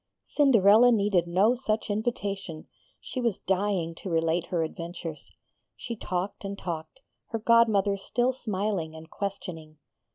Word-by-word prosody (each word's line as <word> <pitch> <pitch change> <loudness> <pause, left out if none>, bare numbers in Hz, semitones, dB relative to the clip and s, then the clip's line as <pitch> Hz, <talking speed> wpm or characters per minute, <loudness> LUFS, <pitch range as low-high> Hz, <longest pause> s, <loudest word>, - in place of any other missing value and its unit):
Cinderella 240 -4 +5
needed 200 -6 +2
no 190 +7 +4
such 220 -4 -2
invitation; 200 -6 -3 0.3
she 255 - -5
was 235 -5 0
dying 190 -3 -1
to 190 - -6
relate 165 +1 +1
her 170 -3 0
adventures. 165 -2 -6 0.5
She 235 - -5
talked 185 -2 -4
and 200 0 -5
talked, 170 +9 -6 0.3
her 225 - -3
godmother 215 -3 +4
still 245 +6 0
smiling 200 -8 -2
and 160 0 -12
questioning. 165 -6 -6
200 Hz, 130 wpm, -27 LUFS, 170-220 Hz, 0.5 s, Cinderella